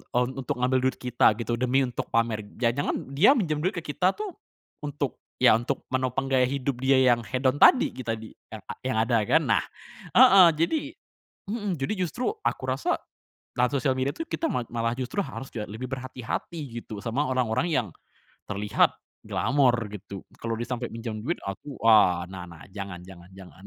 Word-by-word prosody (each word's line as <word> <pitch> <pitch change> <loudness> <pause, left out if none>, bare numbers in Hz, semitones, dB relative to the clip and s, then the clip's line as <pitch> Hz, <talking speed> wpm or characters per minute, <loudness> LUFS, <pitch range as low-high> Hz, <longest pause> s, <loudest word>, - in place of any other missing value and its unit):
eee, 125 -1 0 0.2
untuk 125 - -3
ngambil 130 +1 +2
duit - - -4
kita 125 -3 +3
gitu 120 0 -2
demi 130 +2 +2
untuk 125 - -5
pamer, 115 -1 +1 0.2
jangan-jangan 120 +3 0 0.2
dia 180 - +6
minjem 155 - 0
duit 185 +4 0
ke 170 - -3
kita 180 +5 +1
tuh, 425 -3 -5 0.5
untuk 145 -3 -3 0.2
ya - - +6
untuk 120 +5 -1
menopang 130 +1 0
gaya 130 -1 +4
hidup 135 -2 -2
dia 135 0 +4 0.2
yang 120 - +1
hedon 130 +4 -1
tadi 260 - +6
kita 115 -3 -3
di 110 0 -10 0.2
a 110 - -7 0.2
yang 130 -4 -1
ada 115 -1 +2
kan? 160 +4 +4
Nah, 110 -5 +2 0.5
heeh, 190 -2 +9
jadi 170 - +1 0.7
mhm, 205 -6 -2
jadi 135 +8 -1 0.2
justru 250 - -2
aku - - -1
rasa, 130 +1 0 0.6
dalam 125 0 +3
sosial 135 -1 +1
media 135 +2 0
itu 330 - -3
kita 325 - -2
ma 125 - -1
malah 115 0 -1
justru 130 +10 -2
harus 135 -8 -6
kayak 105 -2 -5
lebih 110 +4 -5
berhati-hati 130 +5 -5 0.2
gitu 105 -3 -8
sama 130 +6 0
orang-orang 130 +5 0
yang, 125 -8 +1 0.6
terlihat 105 +1 +2 0.3
glamor 130 0 +2 0.2
gitu 100 -1 -8 0.2
kalau 115 -1 -2
dia - - -1
sampai 125 -1 -2
minjam 115 -1 -5
duit 165 +9 -2
aku, 105 +8 -6
ah, 90 -6 +6
nah 90 -2 -7
nah 85 -2 -13
jangan 100 -3 -6
jangan 90 -2 -13
jangan 95 0 -14
125 Hz, 180 wpm, -26 LUFS, 115-140 Hz, 0.7 s, heeh